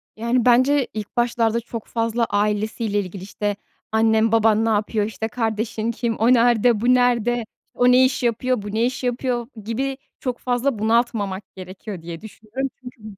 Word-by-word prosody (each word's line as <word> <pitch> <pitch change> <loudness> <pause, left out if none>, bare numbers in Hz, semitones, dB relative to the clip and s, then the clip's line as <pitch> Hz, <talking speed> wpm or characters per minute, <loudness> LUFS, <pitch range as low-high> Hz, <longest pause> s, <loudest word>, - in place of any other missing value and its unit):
Yani 235 +2 0
bence 255 +3 +4
ilk 215 +2 -7
başlarda 235 -1 +1
çok 230 -1 -7
fazla 230 0 0
ailesiyle 210 +1 0
ilgili, 185 -1 -6
işte, 205 +1 -3 0.4
annen, 220 0 +3
baban 225 -1 +3
ne - - +1
yapıyor? 210 0 0
İşte, 220 0 -4
kardeşin 225 -1 -2
kim? 235 0 -2
O 230 +3 +4
nerde? 235 -2 +3
Bu 250 +1 +4
nerde? 240 -1 +2 0.3
O 245 0 +4
ne 255 +1 +6
iş 255 -1 -1
yapıyor? 245 0 0
Bu 205 0 -6
ne 225 +2 +2
iş 250 +1 -3
yapıyor? 245 -1 -1 0.2
Gibi 265 +5 -2 0.2
çok 250 -2 -3
fazla 245 -1 -1
bunaltmamak 220 -3 0
gerekiyor 185 0 -8
diye 165 0 -8
düşünüyorum 220 +5 -5
çünkü 250 -3 -11
230 Hz, 165 wpm, -22 LUFS, 215-245 Hz, 0.4 s, ne